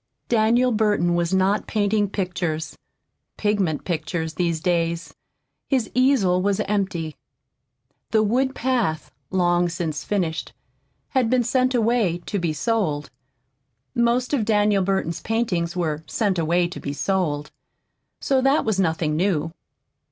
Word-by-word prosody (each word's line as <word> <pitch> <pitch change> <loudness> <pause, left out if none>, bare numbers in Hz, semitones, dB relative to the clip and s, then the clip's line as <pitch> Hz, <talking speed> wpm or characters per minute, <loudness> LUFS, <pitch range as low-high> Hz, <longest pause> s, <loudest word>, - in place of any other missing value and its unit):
Daniel 235 +2 +3
Burton 210 -6 +2
was 170 -1 0
not 190 +2 +2
painting 205 -1 +1
pictures 175 -5 -3 0.6
pigment 200 -8 0
pictures 160 -1 -2
these 170 -1 0
days. 170 0 -1 0.6
His 260 -5 0
easel 245 -9 +3
was 200 0 +1
empty. 190 -6 -2 0.9
"The 220 -1 +3
Woodland 260 +5 +1
Path," 230 -11 -1 0.2
long 175 -1 +2
since 165 -3 -3
finished, 175 -6 -2 0.6
had 255 -4 +1
been 250 0 +3
sent 255 +2 +1
away 225 -6 +2
"to 205 - -2
be 170 -2 0
sold." 155 -6 -1 0.8
Most 240 +3 +1
of 260 -6 +2
Daniel 210 -2 +2
Burton's 190 -3 -1
paintings 185 -7 -1
were 160 -3 -2
"sent 200 -5 0
away 170 +2 +2
to 180 - -7
be 140 - -4
sold," 150 -1 -1 0.7
so 265 -1 +1
that 270 +3 +3
was 215 -3 0
nothing 160 -4 +1
new. 165 -2 0
190 Hz, 130 wpm, -23 LUFS, 170-225 Hz, 0.9 s, Daniel